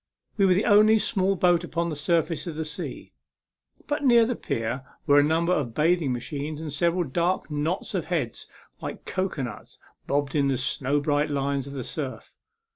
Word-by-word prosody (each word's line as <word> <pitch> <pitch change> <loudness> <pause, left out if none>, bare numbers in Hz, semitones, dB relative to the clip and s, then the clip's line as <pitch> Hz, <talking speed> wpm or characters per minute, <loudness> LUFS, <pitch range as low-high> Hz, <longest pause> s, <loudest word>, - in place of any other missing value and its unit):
We 195 -2 +4
were 185 - +4
the 200 - +1
only 215 0 +6
small 195 -2 +1
boat 175 -2 +3
upon 170 0 -2
the - - -3
surface 165 +3 0
of 165 - -4
the 160 0 -3
sea; 150 -1 -7 0.7
but 295 0 -2
near 235 -4 +6
the 245 +1 -1
pier 120 - -3 0.2
were 145 -2 +6
a - - +5
number 165 +4 +2
of 125 -9 -2
bathing 160 -2 +2
machines, 145 +5 -4
and 155 -3 -5
several 170 +4 +1
dark 170 +4 -1
knots 155 +8 -2
of 180 -5 -1
heads 155 -10 -2 0.3
like - - -6
cocoanuts 140 - -4 0.3
bobbed 145 -1 0
in 145 -2 +2
the 135 -2 +1
snow 140 +1 0
bright 145 +1 +1
lines 140 -1 -1
of 140 - -8
the 135 -3 -4
surf. 135 +1 -6
155 Hz, 185 wpm, -26 LUFS, 140-180 Hz, 0.7 s, only